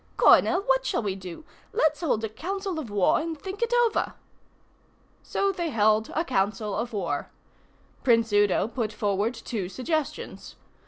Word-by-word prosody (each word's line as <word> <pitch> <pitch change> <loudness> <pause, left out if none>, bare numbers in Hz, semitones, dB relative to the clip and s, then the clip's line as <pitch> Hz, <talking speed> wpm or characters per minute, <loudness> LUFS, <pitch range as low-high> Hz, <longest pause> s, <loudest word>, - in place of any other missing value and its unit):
Coronel, 365 - +6
what 265 -4 +2
shall 255 -3 -1
we 200 -2 -1
do? 185 - -9 0.3
Let's 315 -8 +2
hold 255 -9 0
a 220 - -1
council 375 - -4
of 270 -8 -6
war 205 +4 +3
and 320 -1 -4
think 385 +6 -7
it 470 0 +1
over." 450 - -1 1.1
So 395 0 0
they 345 -3 -3
held 215 -3 +2
a 325 - +1
council 210 -4 0
of 235 +3 -2
war. 175 -9 -2 0.7
Prince 230 -3 +3
Udo 205 0 +3
put 230 -2 -3
forward 210 +2 0
two 200 -7 -4
suggestions. 295 - -3
235 Hz, 155 wpm, -26 LUFS, 205-320 Hz, 1.1 s, Coronel